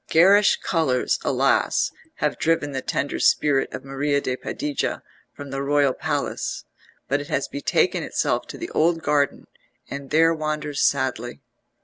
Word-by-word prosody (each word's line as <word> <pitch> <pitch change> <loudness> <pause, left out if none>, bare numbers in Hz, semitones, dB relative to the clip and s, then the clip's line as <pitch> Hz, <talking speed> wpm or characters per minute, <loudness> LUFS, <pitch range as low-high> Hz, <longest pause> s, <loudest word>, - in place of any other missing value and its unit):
Garish 195 +5 +6
colours, 145 -8 0
alas! - - +2 0.2
have - - -1
driven 160 -3 +1
the 135 -1 -3
tender 140 +2 -2
spirit 140 -3 +2
of 130 - -7
Maria 140 +1 0
de 130 -2 -2
Padilla 145 +2 -3 0.3
from 140 -1 -10
the 135 0 -3
royal 140 -1 +2
palace, - - -3 0.4
but 140 +2 0
it 145 - -8
has 135 - -1
betaken 140 - 0
itself - - -1
to - - -8
the - - -6
old 165 +1 +1
garden, 145 -1 +1 0.5
and 140 -1 -6
there 165 +2 +4
wanders 155 -2 -3
sadly. 130 -3 0
145 Hz, 145 wpm, -23 LUFS, 135-155 Hz, 0.5 s, Garish